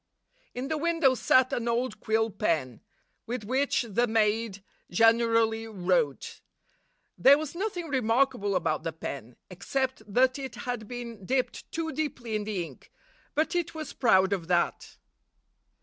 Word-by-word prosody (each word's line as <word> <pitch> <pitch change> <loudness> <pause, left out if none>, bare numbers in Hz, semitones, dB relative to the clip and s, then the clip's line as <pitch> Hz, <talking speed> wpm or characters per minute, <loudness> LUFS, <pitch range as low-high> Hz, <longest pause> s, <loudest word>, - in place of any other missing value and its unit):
In 250 +2 -3
the 310 +1 -2
window 330 -4 +3
sat 255 0 +3
an 240 -1 -1
old 240 +2 -1
quill 220 0 +1
pen, 160 - -1 0.5
with 240 -1 -3
which 260 +5 +1
the 235 +3 +1
maid 220 -2 0 0.3
generally 225 +2 +3
wrote. 175 -8 -1 0.8
There 275 +2 +7
was 310 -1 -5
nothing 355 -2 -3
remarkable 235 -6 +1
about 160 -4 0
the 165 0 -4
pen, 125 -6 -7 0.2
except 260 +7 -2
that 255 +4 +3
it 265 -3 -6
had 245 -4 -4
been 235 -4 -7
dipped 255 +5 -2
too 320 -1 -2
deeply 250 -8 -3
in 210 -1 -2
the 205 -5 -2
ink; - - -15 0.4
but 310 +3 +1
it 345 -2 -1
was 310 -3 -6
proud 190 -6 +4
of 175 -4 -3
that. 175 -1 0
230 Hz, 145 wpm, -28 LUFS, 200-265 Hz, 0.8 s, There